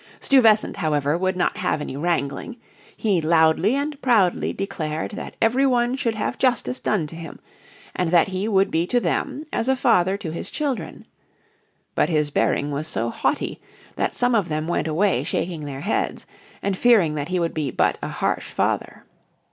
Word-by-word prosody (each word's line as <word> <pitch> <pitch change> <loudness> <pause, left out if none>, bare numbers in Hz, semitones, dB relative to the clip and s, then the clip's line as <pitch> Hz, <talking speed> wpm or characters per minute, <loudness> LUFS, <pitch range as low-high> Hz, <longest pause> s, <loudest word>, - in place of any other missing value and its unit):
Stuyvesant, 225 -8 +4
however, 150 -4 +1
would 185 +1 -1
not 180 - 0
have 180 -4 0
any 150 - -5
wrangling; 160 - -2 0.4
he 200 -6 +1
loudly 160 +7 +3
and 285 +1 -3
proudly 215 -9 +2
declared 160 -6 -4
that 225 +4 -7
every 245 +4 +3
one 245 -1 +2
should 235 -4 -1
have 220 +4 -3
justice 255 0 +1
done 200 -7 0
to 150 - -10
him, 165 -1 -8 0.6
and 180 -2 0
that 175 +2 +4
he 190 +2 -2
would 195 -2 +2
be 165 +2 +1
to 245 - +2
them 280 +4 -2
as 235 - 0
a 265 - +4
father 190 -6 +2
to 175 -6 -5
his 165 - -6
children. 285 -5 -4 0.9
But - - +1
his 150 -3 +1
bearing 145 0 +1
was 145 +2 -3
so 115 -5 -2
haughty - - -1 0.3
that - - -1
some 245 0 +1
of 205 -7 +1
them 155 +1 -2
went 175 - -1
away 180 +5 +1
shaking 165 -3 -3
their 140 -1 -6
heads, 205 +8 -2 0.4
and 200 -1 0
fearing 200 -8 +4
that 145 -1 -3
he 180 0 -1
would 170 -1 -1
be 150 -3 -2
but - - +1
a - - -3
harsh - - -2
father. - - -2
180 Hz, 180 wpm, -23 LUFS, 155-230 Hz, 0.9 s, Stuyvesant